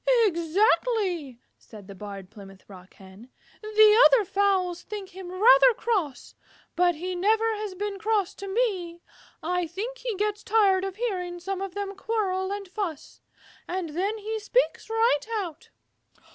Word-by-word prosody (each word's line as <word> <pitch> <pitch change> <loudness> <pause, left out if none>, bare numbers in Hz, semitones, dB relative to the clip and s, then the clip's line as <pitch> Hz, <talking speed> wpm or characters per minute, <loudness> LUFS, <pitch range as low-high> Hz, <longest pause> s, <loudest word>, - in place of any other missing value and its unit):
"Exactly," 355 - +1 0.2
said 210 -3 -13
the 200 - -9
Barred 195 -1 -9
Plymouth 195 -3 -14
Rock 185 -2 -14
Hen. 195 +5 -15 0.3
"The 430 +1 +5
other 485 -5 +3
fowls 380 -2 +1
think 405 -2 -7
him 370 -1 -9
rather - - +6
cross, 360 - -2 0.4
but 350 0 +3
he 365 +4 -4
never 440 +5 +1
has 415 -3 -5
been 405 +1 -4
cross 425 -3 0
to 395 - -8
me. 385 -6 -2 0.4
I 355 +1 -1
think 440 +9 -6
he - - -3
gets 420 +1 -2
tired 395 -3 +3
of 390 -1 -4
hearing 365 -6 -3
some 385 +2 -4
of 390 -1 -5
them 400 -1 -4
quarrel 390 -3 -2
and 405 -1 -5
fuss, 360 -6 -6 0.5
and 360 -2 -3
then 390 +7 -1
he 435 +1 -4
speaks 480 +3 0
right 450 -9 +2
out." 340 -6 -6
385 Hz, 150 wpm, -26 LUFS, 345-430 Hz, 0.5 s, rather